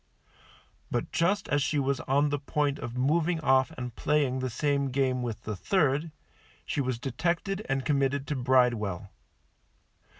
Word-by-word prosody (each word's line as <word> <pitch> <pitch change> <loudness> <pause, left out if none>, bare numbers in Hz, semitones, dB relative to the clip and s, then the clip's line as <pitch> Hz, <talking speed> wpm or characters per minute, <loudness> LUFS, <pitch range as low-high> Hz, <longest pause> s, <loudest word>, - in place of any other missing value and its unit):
But 120 - -2
just 190 +5 +1
as 145 0 +2
she 145 +2 0
was 140 -1 0
on 145 +2 +2
the 145 0 -1
point 145 0 -1
of 120 +1 -6
moving 160 +6 +1
off 130 -1 +3
and 125 -2 -5
playing 140 -3 +1
the 130 0 -2
same 140 +3 0
game 130 -1 0
with 120 -3 -4
the 110 - -4
third, 150 - +1 0.5
she 145 - -1
was 130 -2 -1
detected 170 - -2
and 135 -1 0
committed 140 -1 +1
to 150 - 0
Bridewell. 120 -8 +1
135 Hz, 155 wpm, -28 LUFS, 125-150 Hz, 0.5 s, off